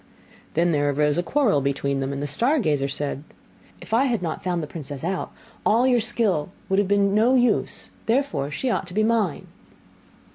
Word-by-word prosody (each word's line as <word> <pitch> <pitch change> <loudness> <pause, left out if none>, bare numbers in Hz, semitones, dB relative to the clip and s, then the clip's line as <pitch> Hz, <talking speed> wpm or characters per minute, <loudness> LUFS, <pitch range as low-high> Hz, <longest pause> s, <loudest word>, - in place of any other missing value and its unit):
Then 170 +2 +3
there 145 -2 +1
arose 150 +2 +1
a - - +3
quarrel 215 - +2
between 140 0 -1
them; 135 0 -2
and 140 +1 -4
the - - -2
star 240 - +2
gazer 145 - +1
said, 140 0 -4 0.6
'If - - -9
I 245 +4 +4
had 235 -8 -1
not 160 -2 -4
found 175 -3 -1
the - - -2
princess 145 -3 -7
out, 185 +2 -2 0.3
all 235 +4 +3
your 250 -2 +3
skill 215 -9 +1 0.2
would 195 +1 +2
have 205 - +1
been 200 0 +3
of - - -2
no 230 +5 +4
use; 245 -1 +1 0.2
therefore 225 - 0
she 245 - -2
ought - - -2
to 180 - -10
be 215 - +3
mine. 220 -8 0
180 Hz, 205 wpm, -23 LUFS, 145-230 Hz, 0.6 s, I